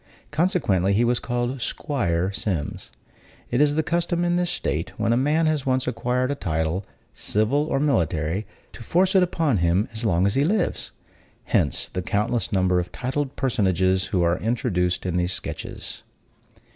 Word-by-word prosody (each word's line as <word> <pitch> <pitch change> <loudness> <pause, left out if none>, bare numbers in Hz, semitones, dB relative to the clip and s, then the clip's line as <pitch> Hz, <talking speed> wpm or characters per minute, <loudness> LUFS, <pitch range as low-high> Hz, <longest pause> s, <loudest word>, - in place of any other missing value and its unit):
consequently, 150 - +2
he 110 +4 +3
was 120 0 +2
called 120 +1 -2
'Squire 95 - -1
Sims. 95 -6 -3 0.6
It 125 - +2
is 145 0 +3
the 160 - +1
custom 170 +1 0
in 175 0 +2
this 175 -1 +1
state, - - -2
when 115 - +1
a - - +3
man 150 +6 +2
has 155 -3 0
once 130 0 +1
acquired 125 +3 0
a - - +1
title, 80 - -1 0.3
civil 115 +8 0
or 135 - 0
military, 90 - 0 0.2
to - - -12
force 180 +10 +2
it 190 - +5
upon 165 - +1
him 85 +4 +2
as 110 +1 -4
long 90 -4 +2
as 100 - +2
he 135 - +2
lives; 190 +3 0 0.5
hence - - +1
the 90 - -4
countless 105 +5 0
number 95 -2 +2
of 90 0 -4
titled 135 +3 -3
personages 95 -6 +1
who 90 -2 0
are 85 +1 +2
introduced 95 -7 0
in 90 -1 -1
these 90 +1 0
sketches. - - -6
115 Hz, 170 wpm, -24 LUFS, 95-145 Hz, 0.6 s, it